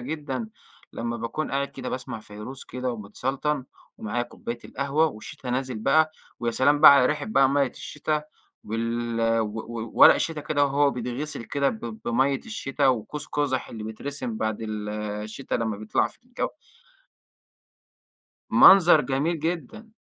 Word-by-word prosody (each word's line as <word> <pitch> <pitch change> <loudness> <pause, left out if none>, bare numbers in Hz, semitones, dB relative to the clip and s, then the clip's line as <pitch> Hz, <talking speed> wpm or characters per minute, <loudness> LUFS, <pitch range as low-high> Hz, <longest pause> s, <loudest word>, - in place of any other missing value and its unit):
جدًا 145 - -4 0.4
لمّا 120 0 -3
باكون 115 +7 -3
قاعد 140 +1 -1
كده 130 -1 -7
باسمع 125 -3 -5
فيروز 105 +6 -9
كده 125 -1 -3
ومتسلطن 130 +6 -3 0.3
ومعايا 115 +3 -2
كوباية 120 0 -6
القهوة 140 +4 +1
والشتا 125 0 -7
نازل 130 -2 -2
بقى 155 +7 +3 0.3
ويا 120 - 0
سلام 145 +5 +3
بقى 155 - +11
علي 125 -2 +5
ريحة 150 -1 -1
بقى 135 -11 +4
مَيّة 140 0 +2
الشتا 150 +1 -3 0.4
وال 115 +1 -2 0.2
و 105 -1 -2 0.4
وورق - - +9
الشتا 160 -2 -2
كده 145 -1 +1
وهو 140 0 +3
بيتغسِل 125 +2 -4
كده 140 -1 0
ب 110 -1 -6
بمَيّة 135 +4 +2
الشتا 145 -11 -2
وقوس 130 +4 -1
قُزح 140 -3 -1
اللي 110 -2 -7
بيترسم 125 +1 -5
بعد 110 0 -2
ال 105 -1 -4 0.3
الشتا 110 +5 -5
لمّا 110 -3 -1
بيطلع 110 +1 0
في - - -14
الجَو. 250 0 -3 2.0
منظر 180 -5 +8
جميل 150 +5 0
جدًا. 180 - -4
130 Hz, 145 wpm, -25 LUFS, 115-145 Hz, 2.0 s, بقى